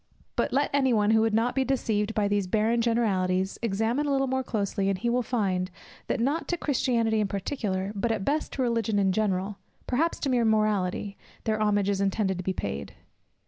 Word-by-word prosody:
But - - 0
let 280 +2 +1
any 265 -3 +3
one, 210 -1 +3
who 220 0 +5
would 225 0 +2
not 230 +2 +2
be 265 - +1
deceived, 225 -5 0
by 210 -1 +2
these 205 -2 0
"barren 220 +4 +2
generalities" 190 -5 +1
examine 230 +6 0
a - - 0
little 270 0 +2
more 260 0 0
closely, 200 -5 -1
and 195 - 0
he 235 +5 -1
will 250 +1 +2
find, 195 -7 -1 0.4
that - - -1
not 280 +8 0
to 350 - -1
Christianity 235 -7 +1
in 210 - +1
particular, 195 -2 -2
but 220 +3 -1
at 210 -4 -2
best 300 +2 0
to 265 - -1
Religion 230 -3 0
in 195 -1 +3
general, 195 -1 -1 0.3
perhaps 315 +7 0
to 280 - 0
mere 245 -2 +3
Morality, 210 -3 0 0.2
their 215 -1 0
homage 205 -2 +2
is 200 -1 0
intended 195 -1 0
to - - -4
be 190 - 0
paid. 70 - -5
220 Hz, 205 wpm, -27 LUFS, 195-245 Hz, 0.4 s, who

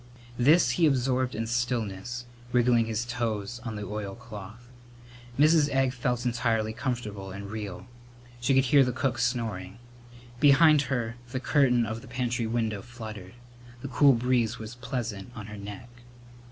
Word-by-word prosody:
This 150 +8 +5
he 165 -2 +3
absorbed 130 -2 +1
in 115 - -2
stillness, 120 -1 -2 0.3
wriggling 120 -2 +3
his 115 +1 -2
toes 115 -2 -3
on 115 -3 -5
the 105 - -5
oilcloth. 105 +2 -7 0.7
Mrs. 155 0 +5
Egg 135 -2 +1
felt 125 -1 -1
entirely 115 -3 0
comfortable 110 -5 -4
and 100 +1 -7
real. 105 -3 -6 0.5
She 130 +3 +2
could 135 0 +4
hear 140 +2 +6
the 125 -1 -1
cook 130 -4 -1
snoring. 110 -6 -2 0.6
Behind 150 +1 +6
her 120 -4 -2
the 130 +1 -3
curtain 130 -4 +3
of 110 +1 -4
the - - -13
pantry 120 -1 -1
window 110 -3 -1
fluttered. 110 -6 -9 0.5
The 140 - -4
cool 140 +2 +5
breeze 120 -1 +1
was 110 +1 -8
pleasant 120 -4 -5
on 105 - -7
her 105 0 -8
neck. 105 +3 -8
120 Hz, 150 wpm, -28 LUFS, 110-125 Hz, 0.7 s, hear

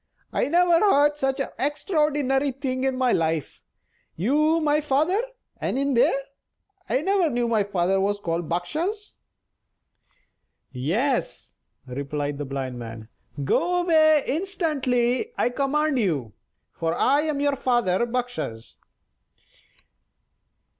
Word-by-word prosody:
I - - +1
never 345 +2 +4
heard 295 -7 +3
such 270 0 0
an 275 - -2
extraordinary 290 -2 +1
thing 260 0 -3
in 265 -1 0
my 255 -1 +2
life. 160 -3 -1 0.5
You 300 - +2
my 300 -1 +2
father; 305 +8 +1 0.4
and - - -2
in 280 0 0
there! 245 +3 +3 0.7
I 260 - +1
never 380 -1 +2
knew 240 -2 0
my 220 -3 +2
father 190 -1 0
was 205 +1 0
called 170 -4 -3
Bakshas!" 330 - -3 1.6
"Yes," 195 - -1 0.3
replied 140 +2 -4
the 145 - -3
Blind 130 -2 -4
Man; 115 -1 -8 0.3
"go 355 - +1
away 310 -3 +4
instantly, 295 - 0
I - - +2
command 280 +2 0
you, 145 - -1 0.4
for 165 0 -2
I 280 +3 +3
am 305 -2 -2
your 285 0 +1
father 240 -7 +1
Bakshas." 245 - -4
265 Hz, 120 wpm, -24 LUFS, -, 1.6 s, never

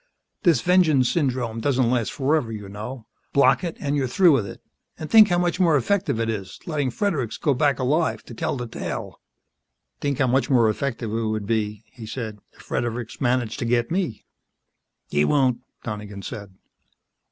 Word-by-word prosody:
"This 170 - +4
vengeance 160 -8 +4
syndrome 125 -7 -1
doesn't 130 -2 +2
last 120 -3 0
forever, 135 -3 0
you 105 -2 -6
know. 110 +4 -7 0.3
Block 140 +4 +4
it, 170 -2 -4
and 145 -1 -1
you're 135 -2 0
through 175 +7 +5
with 120 -9 +2
it. - - -9 0.4
And 155 - -7
think 220 -2 +9
how 175 - +1
much 175 0 0
more 165 -5 +4
effective 180 - 0
it 115 - 0
is, 100 -5 -4
letting 145 -5 -1
Fredericks 135 - -1
go 145 - +1
back 140 +2 +2
alive 150 +6 0
to - - -11
tell 160 -4 -2
the 125 - -4
tale." 115 - -6 0.8
"Think 140 -2 -1
how 130 - +3
much 130 +2 +1
more 120 -5 +4
effective 115 -2 -3
it 115 0 -1
would 110 -1 -2
be," 105 -1 -1
he 110 +1 -11
said, 110 -2 -5
"if - - -17
Fredericks 120 +1 -3
managed 120 -2 0
to 120 - -2
get 120 +2 +1
me." 170 - -2 0.8
"He 75 0 +1
won't," 130 - +2 0.2
Donegan 105 -3 -6
said. 100 -1 -7
125 Hz, 180 wpm, -23 LUFS, 110-145 Hz, 0.8 s, think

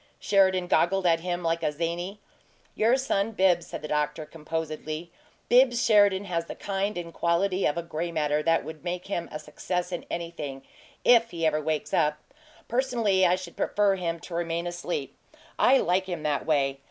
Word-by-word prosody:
Sheridan 190 -2 +3
goggled 185 +2 +2
at 165 -1 +4
him 175 +1 -3
like 165 0 0
a 150 - 0
zany. 170 +6 -3 0.5
"Your 230 +4 +3
son 225 -5 0
Bibbs," 185 -3 +2
said - - -7
the - - -4
doctor, 150 +1 -1
composedly, 155 +1 -5 0.4
"Bibbs 245 -1 +4
Sheridan 205 -3 +5
has 170 -3 -2
the - - -7
kind 200 0 -2
and 170 -1 -6
quantity 185 +4 +1
of 170 +3 -2
'gray 170 +1 -3
matter' 150 -2 0
that 165 +1 +2
will 160 0 -7
make 180 0 -4
him 175 -4 -3
a - - -4
success 180 +4 -4
in 175 - -4
anything 150 -6 -5 0.4
if 235 -1 +6
he 165 -2 -3
ever 155 -1 +2
wakes 155 0 -2
up! 150 -2 +2 0.5
Personally 230 -7 +2
I 175 - +3
should 185 -2 -9
prefer 205 -1 +2
him 170 -3 -3
to 180 - -10
remain 170 0 -2
asleep. 175 - -4 0.4
I 270 - +6
like 185 -3 +1
him 175 -4 -4
that 150 -2 -1
way. 135 -3 +1
175 Hz, 180 wpm, -27 LUFS, 160-195 Hz, 0.5 s, if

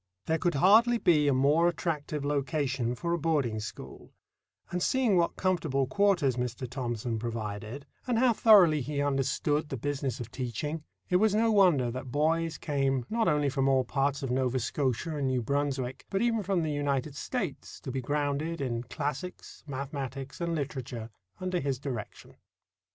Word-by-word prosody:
There 160 0 +1
could 175 -4 +1
hardly 220 - +5
be 155 -8 +3
a - - +4
more 145 +6 +4
attractive 155 -4 -2
location 140 -4 -1
for 170 +5 -2
a 170 - 0
boarding 145 -9 0
school; 105 - -9 0.6
and 180 - -2
seeing 250 -1 +2
what 170 -1 +2
comfortable 160 -8 0
quarters 170 - +2
Mr. 125 +1 -3
Thomson 120 -3 -3
provided, 110 +3 -5 0.2
and 245 -2 +1
how 245 0 +4
thoroughly 190 -10 +6
he 140 +3 -3
understood 145 +2 0
the 135 - -3
business 135 0 -2
of 120 -1 -7
teaching, 145 +5 -4 0.3
it 180 - +5
was 210 +1 +3
no 225 +1 +3
wonder 175 - +4
that 130 +1 -6
boys 160 +3 +1
came 135 -4 0
not 225 0 +1
only 150 -1 +2
from 135 0 +1
all 130 -1 +3
parts 140 +2 -1
of 130 - -2
Nova 130 0 +1
Scotia 135 +5 -1
and 140 -2 0
New 130 -2 0
Brunswick, 135 -1 -2
but 195 +2 0
even 230 -2 +2
from 190 -3 0
the 155 - -1
United 145 -1 -1
States, 190 - -4
to 130 - -5
be 130 +1 -2
grounded 145 +4 -1
in 120 -4 -2
classics, 150 +7 -5
mathematics, 135 +1 -5
and 170 -1 -1
literature 130 -6 -5 0.3
under 185 -1 -1
his 135 -3 -1
direction. 125 -5 -7
145 Hz, 165 wpm, -29 LUFS, 130-170 Hz, 0.6 s, thoroughly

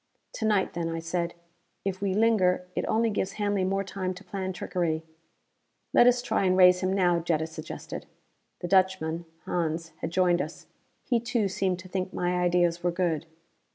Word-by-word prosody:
"To 220 - -3
night 210 -3 +2
then," 170 -1 -2
I 165 - -3
said. 170 +1 -2 0.5
"If 190 -1 -2
we 195 -2 0
linger, 200 -5 +3
it - - -1
only 225 0 +2
gives 195 -1 -1
Hanley 205 -2 0
more 195 +1 0
time 185 -1 -3
to 185 - -11
plan 190 -2 -4
trickery." 170 -3 -2 0.9
"Let 240 - +7
us 245 0 +4
try 220 -4 +1
and 185 0 +3
raise 180 -1 +7
him 185 0 0
now," 180 -3 +3
Jetta 165 -2 0
suggested. 160 - -7 0.5
The 175 - -2
Dutchman, 180 -3 +2 0.2
Hans, 165 -1 -2
had 160 - -4
joined 175 0 +3
us. - - -7 0.4
He 240 -2 +1
too, 235 -2 0
seemed 190 -1 0
to 185 - -12
think 185 0 -3
my 180 0 0
ideas 175 -1 +2
were 175 - +1
good. 170 -3 -1
185 Hz, 180 wpm, -28 LUFS, 175-195 Hz, 0.9 s, Let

